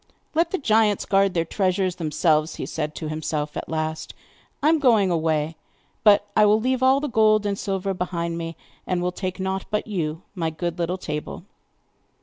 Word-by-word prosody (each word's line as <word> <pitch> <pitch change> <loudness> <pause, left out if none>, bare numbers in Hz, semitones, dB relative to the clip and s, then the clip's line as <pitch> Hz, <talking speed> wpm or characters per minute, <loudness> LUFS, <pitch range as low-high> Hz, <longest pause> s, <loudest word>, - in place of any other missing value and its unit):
'Let 330 +2 +2
the 380 - -1
giants 220 - +2
guard 195 -1 +2
their 165 -1 +1
treasures 185 -1 0
themselves,' 155 -1 +1
he - - -4
said 150 -1 -4
to 155 - -5
himself 155 -1 -3
at - - -5
last; 155 0 -3 0.5
'I 300 - +5
am 320 0 +4
going 225 -9 +4
away. 160 -1 0 0.5
But 205 -1 +6
I 215 - +6
will 210 +1 +4
leave 255 +2 0
all 260 +1 +5
the 295 - -2
gold 215 -3 +3
and 205 - +1
silver 195 0 -2
behind 170 -2 -3
me, 165 0 -5 0.3
and 180 -1 0
will 180 - 0
take 185 +1 -4
nought 190 0 -2
but 210 - -1
you, 165 -6 -3
my 165 -5 -1
good 170 +2 -4
little 175 +2 -1
table. 150 -1 -5
185 Hz, 185 wpm, -24 LUFS, 160-210 Hz, 0.5 s, But